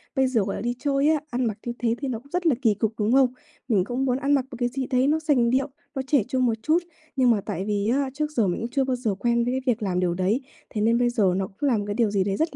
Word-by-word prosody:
Bây 265 -1 +3
giờ 245 -4 +1
gọi 195 0 -3
là - - -5
đi 240 +2 -1
chơi 280 +1 +2
á, 315 -1 +3
ăn 250 +1 -1
mặc 215 -3 -2
như 240 - -2
thế 230 -1 +1
thì 275 - -2
nó 235 -4 -3
cũng 280 +4 -22
rất 360 0 -1
là 295 - +4
kỳ 225 -5 +4
cục, 220 +2 -1
đúng 210 +1 +1
không? 260 -2 +4 0.3
Mình 210 -7 +3
cũng 245 +6 -2
muốn 250 -1 +1
ăn 280 +1 +1
mặc 270 -3 +2
một 245 - -7
cái 245 -1 +1
gì 260 +1 -3
đấy 255 0 +2
nó 310 +2 +2
sành 285 -7 +2
điệu, 265 +3 +1 0.3
nó 270 - -1
trẻ 270 -5 +3
trung 255 -1 +1
một 235 - +2
chút. 330 +3 +2 0.3
Nhưng 255 -3 +4
mà 215 -3 +1
tại 190 0 -4
vì 205 -1 -1
á, 270 +2 +1
trước 300 +1 -2
giờ 230 -9 +1
mình 175 - -2
cũng 230 - -3
chưa 270 +2 +1
bao 260 -1 0
giờ 225 -5 -1
quen 235 +3 +1
với 245 - 0
cái 260 - -1
việc 225 - -12
làm 180 -3 0
điều 180 -1 +1
đấy. 190 +8 0 0.3
Thế 210 - -3
nên 230 +2 +3
bây 245 0 +2
giờ 210 -7 +2
nó 190 0 -1
cũng 210 +10 -2
là 235 - +2
một 205 - -2
cái 205 - -1
điều 225 -2 +2
gì 200 -2 +2
đấy 195 0 -1
rất 320 +1 -1
245 Hz, 330 wpm, -25 LUFS, 210-270 Hz, 0.3 s, là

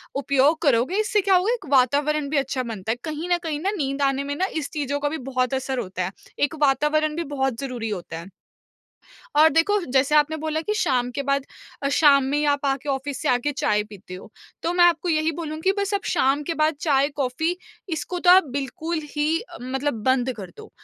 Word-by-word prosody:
उपयोग 280 +3 +2
करोगे 275 - +2
इससे 425 -1 +2
क्या 390 0 +3
होगा 375 +6 +2
एक 465 -6 -5
वातावरण 285 +3 +2
भी 300 - 0
अच्छा 270 -1 -1
बनता 220 -3 -4
है, - - 0
कहीं 315 +2 -4
न 350 - +3
कहीं 310 -3 -2
ना 380 +6 -1
नींद 275 -2 -2
आने 275 0 +1
में 285 0 -3
ना 370 - 0
इस 300 -2 -3
चीज़ों 285 -1 -2
का 290 0 0
भी 320 - -3
बहुत 255 -1 0
असर 265 -1 -2
होता 185 -3 -4
है, 185 - -4 0.3
एक 290 +3 +1
वातावरण 300 +2 +2
भी 340 - -2
बहुत 265 -4 -1
ज़रूरी 245 -5 -4
होता 175 -5 -5
है। 170 - -10 1.1
और 310 +2 +7
देखो, 405 +6 +2
जैसे 270 +2 +3
आपने 300 +1 +3
बोला 315 0 -2
कि 420 +6 -2
शाम 250 - +1
के 280 - -3
बाद 275 0 0 0.4
अ, 280 - +1
शाम 280 -1 +5
में 280 +2 0
ही 300 - 0
आप 285 0 0
आके 275 +1 -1
ऑफिस 275 0 -2
से - - 0
आके 250 +4 +1
चाय 210 -6 +1
पीते 200 -3 -11
हो, 185 - -11 0.3
तो 340 - 0
मैं 355 0 +5
आपको 350 +1 +2
यही 315 0 +1
बोलूँगी 320 +3 -1
बस 400 0 -1
आप 400 - -2
शाम 285 -3 +2
के 330 +3 -3
बाद 310 0 +2
चाय, 280 -3 +2
कॉफ़ी 295 +6 -1 0.3
इसको 355 +2 -3
तो 355 - +5
आप 375 +1 +7
बिल्कुल 315 +4 -3
ही 305 +2 0
अ, 475 - -12
मतलब 265 +3 -2
बंद 260 -1 +2
कर 195 -4 -8
दो। 435 0 -12
285 Hz, 220 wpm, -23 LUFS, 265-320 Hz, 1.1 s, और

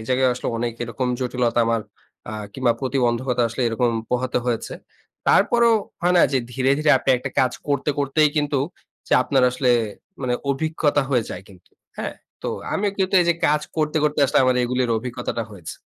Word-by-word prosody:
এই - - -8
জায়গায় 130 0 +3
আসলে 125 - -4
অনেক 120 0 -1
এরকম 125 +2 -3
জটিলতা 125 -2 0
আমার 115 0 +1 0.5
অ্যা - - -6 0.2
কিংবা 130 -1 +1
প্রতিবন্ধকতা 125 -2 0
আসলে 115 +3 -3
এরকম 120 +1 +1 0.2
পোহাতে 125 0 0
হয়েছে। 120 -2 -2 0.6
তারপরেও 235 -1 +4 0.3
হয় 180 +1 +2
না 175 - +6
যে 135 - +3
ধীরে, 130 +1 +1
ধীরে, 155 0 +3
আপনি 135 - 0
একটা - - -5
কাজ 130 -1 +2 0.2
করতে, 140 +1 +1
করতেই, 145 +2 +3
কিন্তু 145 -2 +1 0.5
যে - - -2
আপনার 135 0 +1
আসলে 125 0 +1 0.5
মানে 125 -1 0 0.2
অভিজ্ঞতা 145 0 +1
হয়ে 125 -4 +2
যায় 90 - -6
কিন্তু। 95 -3 -19 0.3
হ্যাঁ? - - -4 0.3
তো - - -2 0.2
আমিও 205 +1 0
কিন্তু 190 0 0
এই 175 - +1
যে - - +2
কাজ 150 +1 +2 0.2
করতে, 155 0 0
করতে, 150 0 0
আসলে 135 - +2
আমার 130 -1 +3
এগুলোর 125 0 0
অভিজ্ঞতাটা 120 -1 -4
হয়েছে। 90 -6 -9
130 Hz, 180 wpm, -22 LUFS, 120-145 Hz, 0.6 s, না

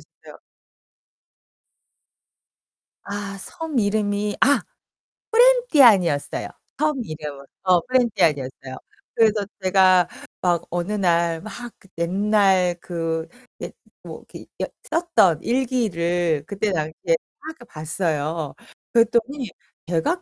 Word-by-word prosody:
어요. - - -17 2.7
아, 200 -1 -5
섬 320 - -4
이름이 205 0 0
아 280 +5 +5 0.9
쁘렌티안이었어요. 250 - +4 0.3
섬 305 -1 +1
이름은 150 -5 -7 0.2
어 185 -2 +4
쁘렌티안이었어요. 160 - 0 0.4
그래서 215 -2 +3 0.2
제가 185 -2 +5 0.3
막 175 -2 +1
어느 175 +3 -3
날 170 -4 +1
막 235 +3 -8
그 - - -21
옛날 190 0 +2
그 165 -2 -3 0.3
옛 - - -6 0.3
뭐 - - -9
이렇게 - - -10 0.2
여 - - -1 0.2
썼던 330 - +2
일기를 175 - 0
그때 200 +3 -2
당시에 155 -3 -2 0.5
막 310 - -7
이렇게 320 -6 -11
봤어요. 155 -2 -3 0.4
그랬더니 235 +2 +1 0.4
제가 175 - 0
195 Hz, 215 characters per minute, -22 LUFS, 170-230 Hz, 2.7 s, 아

